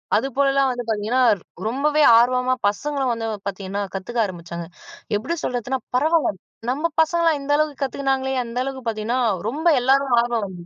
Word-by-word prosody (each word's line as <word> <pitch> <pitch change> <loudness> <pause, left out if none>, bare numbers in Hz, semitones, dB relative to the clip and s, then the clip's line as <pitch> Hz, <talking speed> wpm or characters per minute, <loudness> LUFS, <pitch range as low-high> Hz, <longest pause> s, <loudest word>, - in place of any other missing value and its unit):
அதுபோலலாம் 275 0 +2
வந்து 245 -1 -4
பார்த்தீங்கன்னா, 220 +3 0 0.5
ரொம்பவே 295 +6 +1 0.2
ஆர்வமா 250 +2 +3
பசங்களும் 270 +5 -1
வந்து 230 -1 -3 0.2
பார்த்தீங்கன்னா 200 0 -4
கத்துக்க 195 +5 -4
ஆரம்பிச்சாங்க. 170 -3 -6 0.5
எப்படி 265 +11 -3
சொல்றதுன்னா 250 +2 -2 0.2
பரவாயில்ல 305 - +2 0.3
நம்ம 295 +6 0
பசங்களலா 335 +1 +3
இந்த 280 +1 -4
அளவுக்கு 300 -1 0
கத்துக்கினாங்களே 265 0 -1
அந்த 235 +1 -5
அளவுக்கு 265 -1 -5
பார்த்தீங்கன்னா, 225 +3 -1 0.3
ரொம்ப 300 +7 -4
எல்லாருக்கும் 265 -1 +3
ஆர்வம் 235 -2 -1
வந்தது 180 -3 -9
255 Hz, 140 wpm, -22 LUFS, 220-275 Hz, 0.5 s, ஆர்வமா